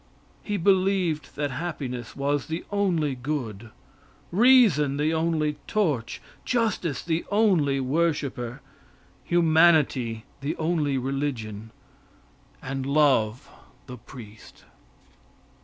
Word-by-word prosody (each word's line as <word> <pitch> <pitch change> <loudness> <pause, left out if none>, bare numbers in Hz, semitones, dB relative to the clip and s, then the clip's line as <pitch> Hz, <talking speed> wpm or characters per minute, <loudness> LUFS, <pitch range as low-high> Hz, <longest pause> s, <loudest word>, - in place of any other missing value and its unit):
He 205 -1 -3
believed 185 -5 +1
that 145 -1 -2
happiness 130 -5 -5
was 140 -1 -1
the 160 +2 -4
only 175 -8 +1
good, 125 -5 -5 0.6
reason 195 - +5
the 155 +2 +1
only 160 -2 0
torch, 150 - -1 0.2
justice 220 - -1
the 165 0 -1
only 185 -10 +2
worshiper, 135 -3 -1 0.6
humanity 160 -9 +3 0.2
the 140 +3 -3
only 155 -4 0
religion, 125 -6 -3 0.9
and 135 0 -4
love 135 -4 +2 0.4
the 125 -2 -10
priest. 110 -3 -13
145 Hz, 90 wpm, -25 LUFS, 130-170 Hz, 0.9 s, reason